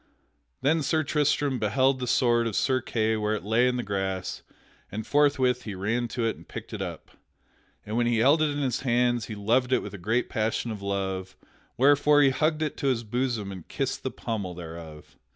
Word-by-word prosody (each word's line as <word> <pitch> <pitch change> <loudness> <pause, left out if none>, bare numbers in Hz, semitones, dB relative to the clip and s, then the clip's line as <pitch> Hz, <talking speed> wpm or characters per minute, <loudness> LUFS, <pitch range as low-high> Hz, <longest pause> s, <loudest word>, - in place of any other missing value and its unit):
Then 160 +3 +3
Sir 155 +2 +1
Tristram 145 -2 +1
beheld 130 +5 +2
the 125 - -3
sword 120 -1 +3
of 110 - -3
Sir 130 -1 +2
Kay 110 -2 0
where 105 0 0
it 105 - -5
lay 115 +5 +3
in 125 0 0
the 120 - -2
grass 95 -2 -3 0.5
and 105 +1 -4
forthwith 135 -3 +3
he 105 -5 -6
ran 115 +6 -1
to 115 0 -2
it 115 - 0
and - - -16
picked - - -8
it - - -4
up. - - -6 0.7
And 105 - -4
when 120 0 +2
he 120 -1 +2
held 140 +8 +4
it 155 - +3
in 145 0 -2
his 130 -3 0
hands 120 -2 +1
he 110 - -6
loved 120 +5 +1
it 130 - +2
with 105 - -7
a 100 - -7
great 115 +7 0
passion 115 +1 -1
of 105 -2 -6
love, 95 -1 -3 0.4
wherefore 145 +2 +5
he 135 - +5
hugged 155 +3 +1
it 155 - -3
to 140 - -1
his 125 -3 +1
bosom 115 -3 -2
and 95 -4 -9
kissed - - -2
the - - -2
pommel 100 -6 -4
thereof. 80 -2 -10
120 Hz, 210 wpm, -27 LUFS, 105-130 Hz, 0.7 s, wherefore